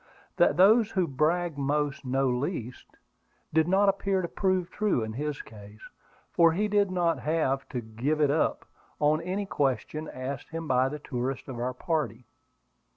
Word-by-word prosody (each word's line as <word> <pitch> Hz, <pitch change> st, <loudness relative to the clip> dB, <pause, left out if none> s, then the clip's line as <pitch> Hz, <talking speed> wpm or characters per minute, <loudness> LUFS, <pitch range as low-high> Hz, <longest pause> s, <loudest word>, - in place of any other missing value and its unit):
That -, -, +4 dB
those 215 Hz, +4 st, +6 dB
who 185 Hz, -5 st, 0 dB
brag 155 Hz, +3 st, 0 dB
most 145 Hz, 0 st, -1 dB
know 135 Hz, +1 st, +1 dB
least, 125 Hz, -, -4 dB, 0.6 s
did 160 Hz, 0 st, +3 dB
not 195 Hz, +3 st, +3 dB
appear 195 Hz, -1 st, +1 dB
to -, -, -1 dB
prove 185 Hz, -1 st, 0 dB
true 210 Hz, -, 0 dB
in 110 Hz, 0 st, -5 dB
his 145 Hz, +3 st, -4 dB
case; 105 Hz, 0 st, -13 dB, 0.4 s
for 165 Hz, -1 st, +5 dB
he 210 Hz, +5 st, 0 dB
did 205 Hz, -1 st, +2 dB
not 175 Hz, -2 st, +1 dB
have 150 Hz, -4 st, -1 dB
to 125 Hz, -3 st, -3 dB
"give 120 Hz, +8 st, -2 dB
it 145 Hz, -2 st, +3 dB
up" 155 Hz, -, 0 dB, 0.3 s
on 150 Hz, +2 st, +3 dB
any 190 Hz, +4 st, -3 dB
question 150 Hz, -1 st, -1 dB
asked 130 Hz, +2 st, -6 dB
him 165 Hz, 0 st, -5 dB
by 130 Hz, 0 st, +3 dB
the 150 Hz, -, -5 dB
tourists 130 Hz, -2 st, -4 dB
of 125 Hz, -3 st, -6 dB
our 125 Hz, +1 st, -2 dB
party. 150 Hz, -3 st, -2 dB
150 Hz, 165 wpm, -28 LUFS, 130-175 Hz, 0.6 s, those